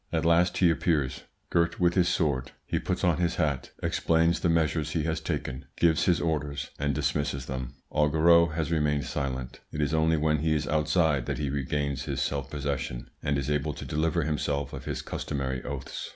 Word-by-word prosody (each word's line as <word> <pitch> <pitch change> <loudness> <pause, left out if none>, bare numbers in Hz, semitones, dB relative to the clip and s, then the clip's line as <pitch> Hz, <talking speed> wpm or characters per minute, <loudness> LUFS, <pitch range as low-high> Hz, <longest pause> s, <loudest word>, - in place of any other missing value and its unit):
At 80 0 0
last 85 +2 +4
he 90 -3 +5
appears, 75 -5 0 0.3
girt 85 -1 +1
with 90 -1 +3
his 90 -1 +3
sword; 70 -7 0
he - - -1
puts - - -2
on 85 -3 +3
his 85 -1 0
hat, 70 -4 -1
explains 85 +1 +2
the 85 - +1
measures 80 -2 +1
he 80 - 0
has 80 0 -1
taken, 65 -3 -3
gives 80 -1 +3
his 85 -3 +3
orders, 75 -4 -2
and 70 -1 0
dismisses 70 -2 -1
them. 65 -2 -5 0.2
Augereau 80 +3 +5
has 80 0 -2
remained 75 -3 +1
silent; 65 -3 -3
it 75 - -5
is 75 +1 0
only 80 0 +3
when 75 0 +2
he 80 +1 +1
is 75 -1 -1
outside 75 -3 +2
that - - -1
he 70 -3 -2
regains 70 0 -2
his - - -2
self 70 -2 -1
possession 65 -4 -3
and 70 -1 0
is 70 +1 -2
able 75 0 0
to - - -7
deliver 80 +2 0
himself 75 -3 -1
of - - -7
his - - -3
customary 65 -2 -3
oaths. 70 -3 -5
75 Hz, 195 wpm, -28 LUFS, 70-80 Hz, 0.3 s, he